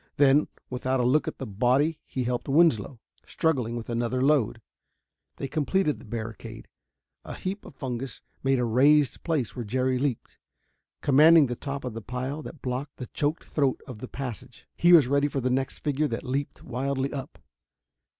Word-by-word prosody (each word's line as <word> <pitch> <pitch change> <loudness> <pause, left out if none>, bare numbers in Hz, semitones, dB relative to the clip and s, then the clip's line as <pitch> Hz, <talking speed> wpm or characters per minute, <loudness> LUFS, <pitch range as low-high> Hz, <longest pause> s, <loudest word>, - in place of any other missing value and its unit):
Then, 145 +1 +5 0.2
without 130 +1 -1
a - - +2
look 140 +5 +3
at - - -4
the 135 - -5
body 130 +9 +1
he 130 - -2
helped 125 +2 -2
Winslow, 135 - +3 0.2
struggling 130 -8 0
with 115 -1 -5
another 120 +1 -1
load. 135 -5 +2 0.8
They 135 - -4
completed 155 +3 0
the - - -13
barricade. 110 0 -7 0.6
A - - -7
heap 195 +2 -5
of - - -12
fungus 130 -1 -5 0.2
made 135 0 +2
a 125 - +1
raised 140 +5 +4
place 150 -9 -1
where 125 - -4
Jerry 130 +3 0
leaped. 135 -4 -3 0.6
Commanding 155 +3 +7
the 120 -2 -3
top 140 +2 -5
of 125 -3 -4
the 115 - -6
pile 130 +7 -4
that 155 -2 -10
blocked 130 +2 -4
the 125 - -7
choked 150 +2 -1
throat 140 -4 0
of 125 -5 -9
the 130 - -6
passage, 125 -1 -7
he 175 - +4
was 165 -6 +8
ready 140 +2 +2
for 140 -1 -2
the 130 0 0
next 130 +1 -1
figure 150 0 +1
that - - -4
leaped 135 +2 -3
wildly 135 +2 -2
up. 135 -3 -6
135 Hz, 180 wpm, -27 LUFS, 125-145 Hz, 0.8 s, was